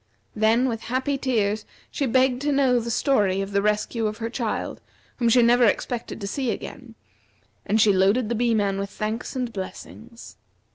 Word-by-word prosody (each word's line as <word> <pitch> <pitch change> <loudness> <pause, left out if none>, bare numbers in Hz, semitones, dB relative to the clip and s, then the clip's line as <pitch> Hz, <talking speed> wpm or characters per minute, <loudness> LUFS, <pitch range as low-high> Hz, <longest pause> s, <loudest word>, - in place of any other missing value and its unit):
Then 225 +4 +3
with 225 -3 -3
happy 260 +4 -1
tears 220 -6 0 0.3
she 280 - -1
begged 255 +1 +2
to 295 +1 0
know 265 -3 +3
the 235 0 -5
story 210 -6 +1
of 195 0 -3
the 200 0 +1
rescue 210 +2 0
of 210 0 -4
her 230 0 -4
child, 235 -4 -3 0.4
whom 235 -2 +2
she 245 +1 +5
never 240 +1 +5
expected 235 +2 -1
to - - -4
see 260 +4 -2
again; 235 +2 -6 0.7
and 220 - +2
she 210 -2 +5
loaded 200 +5 +3
the 235 - -1
Bee 235 0 +1
man 200 -2 0
with 200 0 -3
thanks 215 +5 -4
and 250 -3 -3
blessings. 225 +4 -9
230 Hz, 185 wpm, -24 LUFS, 210-250 Hz, 0.7 s, she